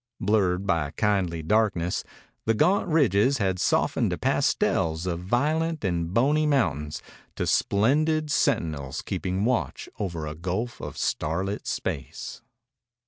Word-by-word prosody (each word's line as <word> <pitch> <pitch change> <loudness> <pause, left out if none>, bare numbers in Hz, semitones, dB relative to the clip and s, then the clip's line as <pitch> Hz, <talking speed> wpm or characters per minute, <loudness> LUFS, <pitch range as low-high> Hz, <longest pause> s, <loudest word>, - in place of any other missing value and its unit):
Blurred 95 -2 +1
by 85 -7 +1
kindly 95 -6 +1
darkness, 90 -2 +1 0.4
the 115 - +2
gaunt 180 - +3
ridges 135 - +3
had 95 -5 0
softened - - +2
to - - -2
pastels 80 +1 +1
of 85 -2 -2
violet 150 - 0
and 85 -2 -1
bony 145 +8 +3
mountains 75 - 0 0.3
to - - -1
splendid 150 +9 +2
sentinels 80 - 0
keeping 95 +2 -2
watch 125 -1 -1
over 85 -6 -3
a 75 - -4
gulf 95 +9 -3
of - - -7
starlit 95 +6 -2
space. - - -4
100 Hz, 125 wpm, -26 LUFS, 85-130 Hz, 0.4 s, gaunt